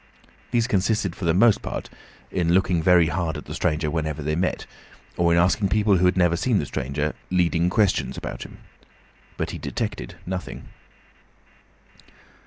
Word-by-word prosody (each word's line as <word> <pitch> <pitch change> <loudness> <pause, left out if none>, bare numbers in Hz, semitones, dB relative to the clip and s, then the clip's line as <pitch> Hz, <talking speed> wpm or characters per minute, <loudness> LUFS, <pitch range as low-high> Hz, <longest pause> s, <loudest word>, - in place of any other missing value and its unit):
These 120 -2 +1
consisted 100 -4 0
for 95 - -5
the 85 - +3
most 110 +2 +5
part - - -5 0.4
in 85 -2 +1
looking 90 -3 +2
very 85 -1 +5
hard 85 -1 -2
at - - -9
the - - -7
stranger 75 0 0
whenever 80 -2 -2
they 75 +1 -1
met, 90 +3 -1 0.5
or 85 -1 +2
in 85 - +4
asking 95 +3 +2
people 105 -1 +3
who 90 - +2
had 90 +1 +1
never 90 -2 +3
seen 110 +5 +1
the 75 - 0
stranger, 70 +3 -2 0.2
leading 90 -1 +2
questions 105 0 +1
about - - -6
him. - - -9 0.8
But - - -2
he - - -6
detected - - -4
nothing. 95 0 -6
90 Hz, 165 wpm, -24 LUFS, 80-95 Hz, 0.8 s, most